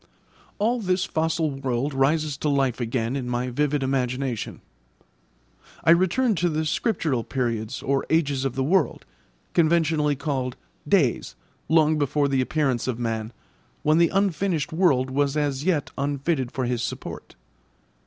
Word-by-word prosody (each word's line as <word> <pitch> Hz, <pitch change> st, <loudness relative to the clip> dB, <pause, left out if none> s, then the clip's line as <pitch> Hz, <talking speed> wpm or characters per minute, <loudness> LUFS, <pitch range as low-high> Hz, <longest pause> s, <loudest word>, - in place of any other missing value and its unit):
All 230 Hz, +4 st, +1 dB
this 185 Hz, -3 st, 0 dB
fossil 160 Hz, -2 st, 0 dB
world 135 Hz, 0 st, -2 dB
rises 145 Hz, +2 st, +1 dB
to 150 Hz, -, -1 dB
life 135 Hz, -3 st, +1 dB
again 115 Hz, +1 st, -1 dB
in 130 Hz, -3 st, -3 dB
my 125 Hz, +1 st, -1 dB
vivid 145 Hz, +2 st, 0 dB
imagination. 130 Hz, -2 st, -2 dB, 1.2 s
I -, -, +5 dB
return 190 Hz, +8 st, +3 dB
to 175 Hz, +2 st, +1 dB
the 155 Hz, 0 st, -1 dB
scriptural 155 Hz, -, 0 dB
periods 115 Hz, -2 st, -3 dB
or 135 Hz, 0 st, 0 dB
ages 145 Hz, -5 st, +1 dB
of 135 Hz, -2 st, -2 dB
the 135 Hz, -, 0 dB
world, 185 Hz, +7 st, +1 dB, 0.5 s
conventionally 160 Hz, -3 st, +2 dB
called 135 Hz, -3 st, -2 dB, 0.3 s
'days,' -, -, +1 dB, 0.3 s
long 155 Hz, -1 st, +4 dB
before 145 Hz, 0 st, +1 dB
the 135 Hz, -1 st, +1 dB
appearance 130 Hz, -3 st, 0 dB
of 125 Hz, -3 st, -1 dB
man, 115 Hz, -2 st, -3 dB, 0.5 s
when 155 Hz, +1 st, +4 dB
the 170 Hz, -1 st, +5 dB
unfinished 190 Hz, -5 st, 0 dB
world 140 Hz, -7 st, +2 dB
was 140 Hz, +2 st, +1 dB
as 145 Hz, -1 st, -1 dB
yet 165 Hz, -6 st, 0 dB
unfitted 140 Hz, -1 st, -1 dB
for 130 Hz, -, -2 dB
his 120 Hz, -1 st, -1 dB
support. 120 Hz, -, -6 dB
145 Hz, 145 wpm, -24 LUFS, 130-160 Hz, 1.2 s, I